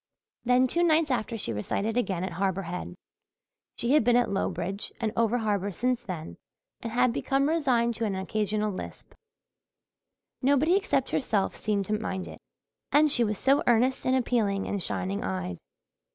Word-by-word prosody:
Then 250 +1 +4
two 340 +7 0
nights 320 -3 +3
after 230 -1 -1
she 115 - -3
recited 200 - -2
again 195 -8 -1
at 190 - -3
Harbour 190 +2 -1
Head. 180 +1 -6 0.8
She 235 - 0
had 300 -3 +5
been 240 +1 +3
at 245 -4 +2
Lowbridge 190 0 -2
and 225 -2 -1
over 230 +1 +2
harbour 205 -3 -1
since 250 +5 -1
then 170 -5 -6 0.4
and 230 - -5
had 245 0 +2
become 275 +2 +1
resigned 255 -7 +2
to 230 - -1
an 200 -3 -1
occasional 210 +2 -1
lisp. 185 - -8 1.3
Nobody 285 +6 +3
except 390 -9 0
herself 210 -7 0
seemed 205 -2 -1
to 210 +2 -1
mind 190 -4 -4
it. - - -10 0.5
And 300 0 +5
she 240 - +5
was 210 -2 -1
so 275 +6 +3
earnest 245 +3 +3
and 260 - +3
appealing 225 -6 +1
and 200 - -2
shining 95 - -2
eyed! 90 -2 -3
220 Hz, 165 wpm, -27 LUFS, 195-255 Hz, 1.3 s, had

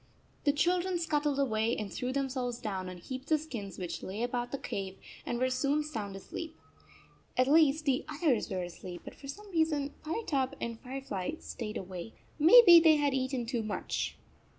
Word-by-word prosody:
The 290 - +5
children 355 +4 +1
scuttled 295 -4 0
away 230 -4 +1
and 205 -3 -5
threw 250 0 -2
themselves 260 -3 -2
down 195 -6 -4
on 180 - -8
heaps 260 - -7
of 310 - +5
skins 235 -11 -7
which 170 -3 -4
lay 205 +5 -4
about 245 0 -2
the 275 - -2
cave, 195 -6 -5 0.3
and 240 - -1
were 255 +1 +1
soon 280 +4 +1
sound 215 -10 -5
asleep. 320 - -7 0.8
At 255 0 +4
least 305 0 +4
the 265 -3 +2
others 300 -6 +1
were 185 -2 -2
asleep, 175 0 -8
but - - -8
for 275 - -12
some 405 +9 -8
reason 310 -4 +1
Firetop 300 - -1
and 230 -1 -4
Firefly 260 - -4
stayed 215 -8 -6
awake. 185 +2 -7 0.2
Maybe 350 +2 +10
they 320 -1 +6
had 290 -2 +2
eaten 260 -2 -1
too 235 0 -1
much. 215 -1 -3
260 Hz, 175 wpm, -31 LUFS, 220-300 Hz, 0.8 s, Maybe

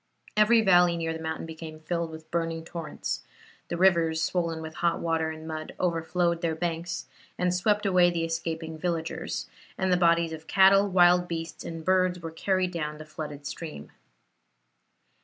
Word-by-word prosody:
Every 220 +2 +5
valley 175 -4 +5
near 165 -1 -2
the 160 - -6
mountain 160 0 -4
became 160 -1 -8
filled 170 +1 -2
with 160 0 -11
burning 165 -1 -2
torrents; 165 -3 -4 0.5
the 170 - -3
rivers, 170 -3 +3
swollen 165 0 -1
with 160 0 -7
hot 170 -1 +2
water 165 -1 0
and 160 0 -8
mud, 155 -1 -6
overflowed 170 0 0
their 165 -2 0
banks, 170 +1 -3 0.3
and 180 0 +1
swept 205 +3 +1
away 180 -2 +5
the 170 -1 -1
escaping 165 -1 -4
villagers; 165 -1 -3 0.3
and 190 -1 +1
the - - +4
bodies 170 -1 +3
of 160 0 -9
cattle, 195 +1 +5
wild 180 -1 +5
beasts, 165 -1 -5
and 165 -1 -7
birds 185 -1 +2
were 165 -1 -6
carried 185 +2 0
down 150 -3 -3
the 155 - -9
flooded 150 -2 -7
stream. 145 - -7
170 Hz, 165 wpm, -27 LUFS, 160-180 Hz, 0.5 s, Every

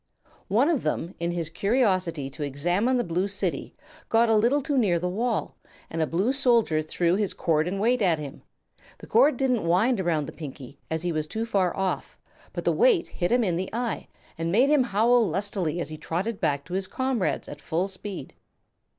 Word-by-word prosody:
One 230 +8 +3
of 330 -6 +1
them, 165 +3 -2
in 170 0 -1
his 170 -2 -3
curiosity 185 - +1
to 150 - -10
examine 175 - +1
the 240 - +1
Blue 180 +2 -1
City, 200 0 -3 0.3
got 230 +1 +4
a 225 - +4
little 240 +7 +3
too 290 0 -1
near 205 -9 +3
the 180 +2 -2
wall, 225 +5 -2 0.3
and 165 - -2
a 160 - +1
blue 195 - +1
soldier 235 - +3
throw 170 +3 0
his 205 -2 -1
cord 160 -1 +1
and 195 +2 -2
weight 240 +3 +2
at 175 -5 +3
him. 145 -2 -8 0.6
The - - -12
cord 285 -2 +4
didn't 255 -4 +1
wind 190 +7 +2
around 165 -5 0
the - - -7
Pinkie, 140 -3 -9
as 160 +1 -2
he 175 - 0
was 155 -1 -2
too 220 +8 -3
far 195 -6 0
off, 190 -1 -2 0.3
but - - -5
the - - +4
weight 475 -8 +3
hit 175 -1 -2
him 245 0 +3
in 175 -5 0
the 185 +1 -3
eye 235 0 -2 0.3
and 165 0 -1
made 245 +9 +4
him 285 -4 +4
howl 235 +2 +3
lustily 185 -2 -2
as 165 - -3
he 155 - -7
trotted 195 +8 -3
back 145 -4 0
to 175 - -9
his 190 0 -1
comrades 260 -5 -1
at 145 - -9
full 170 +6 -1
speed. 195 0 -7
190 Hz, 205 wpm, -26 LUFS, 165-235 Hz, 0.6 s, got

